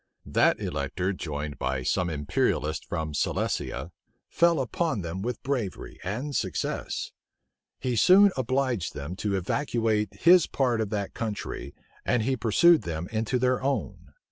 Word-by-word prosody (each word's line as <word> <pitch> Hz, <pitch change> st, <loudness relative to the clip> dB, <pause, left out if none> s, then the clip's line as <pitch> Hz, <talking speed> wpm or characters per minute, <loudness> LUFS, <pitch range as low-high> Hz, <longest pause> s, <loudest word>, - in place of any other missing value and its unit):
That -, -, +3 dB
elector 85 Hz, +8 st, -2 dB
joined 75 Hz, -5 st, -5 dB
by 65 Hz, 0 st, -1 dB
some 90 Hz, +7 st, +1 dB
imperialists 75 Hz, 0 st, 0 dB
from 80 Hz, -3 st, -3 dB
Silesia, 70 Hz, +1 st, -2 dB, 0.4 s
fell 170 Hz, -1 st, +3 dB
upon 155 Hz, -, -1 dB
them 85 Hz, +3 st, -4 dB
with 120 Hz, +3 st, -4 dB
bravery 125 Hz, -9 st, -3 dB
and 125 Hz, +10 st, -3 dB
success. -, -, -2 dB, 0.7 s
He 125 Hz, -2 st, -2 dB
soon 190 Hz, -, +7 dB
obliged 130 Hz, -5 st, -1 dB
them 75 Hz, +5 st, -5 dB
to 100 Hz, 0 st, -1 dB
evacuate 110 Hz, 0 st, 0 dB
his 175 Hz, 0 st, +6 dB
part 125 Hz, -5 st, +1 dB
of 110 Hz, -, -2 dB
that 100 Hz, -2 st, -3 dB
country, 105 Hz, -10 st, -5 dB, 0.3 s
and 120 Hz, -2 st, +1 dB
he 130 Hz, +3 st, +1 dB
pursued 150 Hz, -, +5 dB
them 85 Hz, 0 st, -4 dB
into 110 Hz, +3 st, 0 dB
their 125 Hz, 0 st, +1 dB
own. 135 Hz, +1 st, -3 dB
110 Hz, 140 wpm, -27 LUFS, 85-130 Hz, 0.7 s, soon